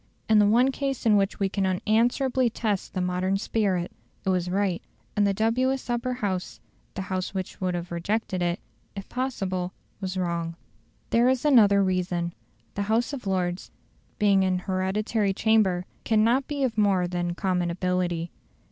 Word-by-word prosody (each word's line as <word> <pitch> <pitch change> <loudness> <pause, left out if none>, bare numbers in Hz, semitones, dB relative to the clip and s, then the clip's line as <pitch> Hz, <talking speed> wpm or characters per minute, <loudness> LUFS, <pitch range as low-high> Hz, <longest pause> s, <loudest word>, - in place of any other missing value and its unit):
In 220 -1 +5
the 205 - +5
one 245 +5 +4
case 270 -2 -3
in 215 -2 +5
which 195 -1 +1
we 195 - +2
can 195 +1 -2
unanswerably 235 +6 +2
test 215 -4 -2
the 185 - 0
modern 180 +2 0
spirit, 195 -4 0 0.3
it - - +1
was 180 -1 +1
right, 190 -2 0 0.3
and 205 -1 +3
the - - +3
dubious 255 +5 +1
Upper 240 +1 -1
House 200 -7 -3 0.4
the 190 - -3
House 185 +1 -3
which 190 0 -5
would 180 -1 0
have 175 0 -5
rejected 185 +2 -1
it, 175 0 0 0.4
if 195 -1 -7
possible 190 -8 -2 0.3
was 190 -1 -4
wrong. 170 -2 -2 0.6
There 235 +2 +4
is 260 +2 0
another 205 -8 +6
reason. 180 -2 -1 0.4
The 200 - -3
House 230 +5 +1
of 255 -7 -6
Lords, 180 -1 -1 0.5
being 200 -2 +4
an 185 -1 +1
hereditary 195 +2 0
chamber, 195 -6 +2 0.2
cannot 230 +4 +3
be 285 -2 -2
of 230 -4 0
more 195 -4 +3
than 175 -1 -2
common 180 -2 0
ability. 175 -1 -1
195 Hz, 165 wpm, -26 LUFS, 180-225 Hz, 0.6 s, another